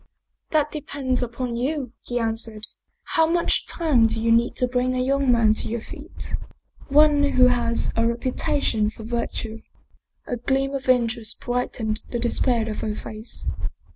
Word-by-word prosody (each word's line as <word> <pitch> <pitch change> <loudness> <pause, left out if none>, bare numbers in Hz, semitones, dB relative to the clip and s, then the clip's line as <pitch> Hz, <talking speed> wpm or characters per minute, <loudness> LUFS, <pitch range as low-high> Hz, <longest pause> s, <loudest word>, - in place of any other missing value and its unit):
" - - -52
That 300 -1 +2
depends 270 -4 -2
upon 240 0 -3
you," 265 -1 -2
he 245 - -3
answered. 225 -2 -2 0.2
" - - -49
How 320 0 +5
much 340 +1 +1
time 285 -9 +3
do 225 - -1
you 230 +1 +2
need 235 +1 +3
to 250 - +1
bring 250 +1 0
a - - 0
young 270 0 +2
man 230 -3 +4
to - - -3
your 230 0 -3
feet? - - -8 0.5
One 295 +1 +5
who 255 -3 +5
has 240 -1 0
a 230 0 +3
reputation 235 -2 0
for 220 - -11
virtue? 225 -1 -3 0.3
" - - -42
A 245 - -3
gleam 270 +3 0
of 270 -1 -3
interest 235 -2 +2
brightened 235 -3 -2
the 240 - -2
despair 235 -1 +1
of 215 - -3
her 215 -1 -2
face. 215 +2 -7
245 Hz, 170 wpm, -24 LUFS, 225-265 Hz, 0.5 s, How